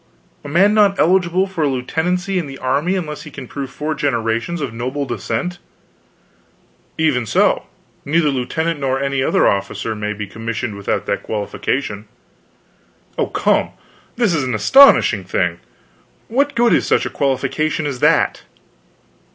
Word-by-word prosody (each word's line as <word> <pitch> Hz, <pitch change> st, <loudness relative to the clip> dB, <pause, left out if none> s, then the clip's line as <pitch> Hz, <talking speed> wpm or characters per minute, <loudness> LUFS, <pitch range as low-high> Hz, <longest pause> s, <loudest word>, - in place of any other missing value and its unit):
"A -, -, -8 dB
man 190 Hz, +8 st, +4 dB
not 205 Hz, -2 st, +4 dB
eligible 180 Hz, +1 st, +3 dB
for 190 Hz, -5 st, -3 dB
a -, -, +3 dB
lieutenancy 175 Hz, +8 st, -1 dB
in 165 Hz, -, -4 dB
the 135 Hz, -1 st, -8 dB
army 145 Hz, +9 st, 0 dB
unless 155 Hz, -5 st, -4 dB
he -, -, -10 dB
can 130 Hz, -3 st, -9 dB
prove 140 Hz, 0 st, -5 dB
four 150 Hz, +3 st, -3 dB
generations 120 Hz, +2 st, -1 dB
of 135 Hz, -6 st, -4 dB
noble 130 Hz, +5 st, -3 dB
descent?" 180 Hz, +5 st, -3 dB, 1.4 s
"Even 140 Hz, -8 st, +1 dB
so; -, -, +2 dB, 0.4 s
neither 155 Hz, +1 st, +2 dB
lieutenant 145 Hz, +5 st, -2 dB
nor 135 Hz, -1 st, 0 dB
any 140 Hz, -1 st, -1 dB
other -, -, +3 dB
officer 100 Hz, +3 st, -1 dB
may 105 Hz, 0 st, -3 dB
be 105 Hz, 0 st, -5 dB
commissioned 115 Hz, +2 st, -4 dB
without 100 Hz, -1 st, -2 dB
that -, -, -1 dB
qualification." 105 Hz, +1 st, -3 dB, 1.1 s
"Oh, -, -, +1 dB
come, -, -, +1 dB, 0.4 s
this 230 Hz, -6 st, +1 dB
is 150 Hz, -4 st, 0 dB
an 125 Hz, -3 st, -1 dB
astonishing 120 Hz, -, +6 dB
thing. 90 Hz, -2 st, -1 dB, 0.7 s
What 280 Hz, +4 st, +1 dB
good 235 Hz, 0 st, +4 dB
is -, -, +2 dB
such -, -, +2 dB
a -, -, -2 dB
qualification 140 Hz, +3 st, -1 dB
as 140 Hz, -4 st, -3 dB
that?" -, -, +2 dB
140 Hz, 150 wpm, -18 LUFS, 120-175 Hz, 1.4 s, astonishing